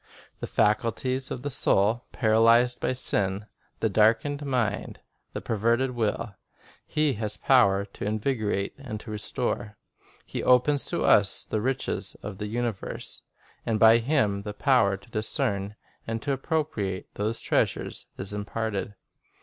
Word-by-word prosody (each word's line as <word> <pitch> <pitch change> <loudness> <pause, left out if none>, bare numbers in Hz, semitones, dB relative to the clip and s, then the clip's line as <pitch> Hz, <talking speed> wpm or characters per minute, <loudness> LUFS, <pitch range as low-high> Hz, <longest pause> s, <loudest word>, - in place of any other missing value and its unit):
The - - -4
faculties 125 +5 0
of 125 - -5
the 145 - -2
soul, 115 -2 +2
paralyzed 115 +2 +4
by - - 0
sin, 100 -5 -1 0.4
the 115 - +3
darkened 115 +8 +2
mind, 120 -7 -1 0.3
the - - -4
perverted 115 +4 +1
will, 115 -2 -2 0.5
He 150 -2 +1
has 105 -1 -3
power 100 -8 +4
to 100 - -8
invigorate 110 -2 -1
and 125 -6 -6
to 110 - -9
restore. 105 -1 -3 0.5
He - - -4
opens 130 +3 +3
to - - -1
us 100 -2 +4
the 110 - -2
riches 130 +3 -2
of 100 -2 -7
the 105 - -3
universe, 115 -2 -3 0.4
and 110 -2 0
by 115 +1 +7
Him 115 -6 +1
the 105 0 -6
power 115 -7 +3
to 120 - -20
discern 105 -2 -1 0.3
and 115 0 -2
to 145 - -1
appropriate 135 - -2
these 110 +3 -2
treasures - - -1
is 95 +1 -6
imparted. 105 0 -3
110 Hz, 140 wpm, -27 LUFS, 105-125 Hz, 0.5 s, by